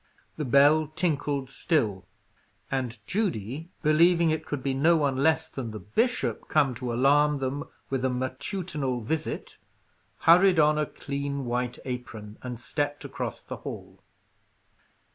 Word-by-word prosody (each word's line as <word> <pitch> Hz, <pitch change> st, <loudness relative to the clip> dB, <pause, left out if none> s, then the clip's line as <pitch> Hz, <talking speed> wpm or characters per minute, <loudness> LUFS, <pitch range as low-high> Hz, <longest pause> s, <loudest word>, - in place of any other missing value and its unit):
The 150 Hz, -, -3 dB
bell 145 Hz, +4 st, +5 dB
tinkled 145 Hz, -5 st, -1 dB
still, 105 Hz, -, 0 dB, 0.6 s
and 125 Hz, -3 st, -2 dB
Judy, 160 Hz, -, -2 dB
believing 165 Hz, +2 st, +4 dB
it 155 Hz, 0 st, -2 dB
could 145 Hz, -3 st, -3 dB
be 135 Hz, -, 0 dB
no 160 Hz, +5 st, +4 dB
one 140 Hz, -3 st, +1 dB
less 160 Hz, +3 st, +2 dB
than 135 Hz, -7 st, -5 dB
the 110 Hz, -1 st, -6 dB
bishop 120 Hz, -, -1 dB
come 145 Hz, -4 st, +3 dB
to 125 Hz, +1 st, -4 dB
alarm 145 Hz, +4 st, +4 dB
them 135 Hz, +1 st, -3 dB, 0.3 s
with 135 Hz, -1 st, -1 dB
a 130 Hz, -, +2 dB
matutinal 130 Hz, +1 st, -3 dB
visit, 155 Hz, +8 st, -4 dB, 0.6 s
hurried 180 Hz, +2 st, +6 dB
on 150 Hz, 0 st, +4 dB
a 150 Hz, -, 0 dB
clean 140 Hz, -1 st, -4 dB
white 125 Hz, 0 st, -2 dB
apron, 115 Hz, -5 st, -6 dB
and 125 Hz, -2 st, -6 dB
stepped 145 Hz, +3 st, -3 dB
across -, -, -5 dB
the -, -, -7 dB
hall. -, -, -9 dB
140 Hz, 140 wpm, -27 LUFS, 125-155 Hz, 0.6 s, hurried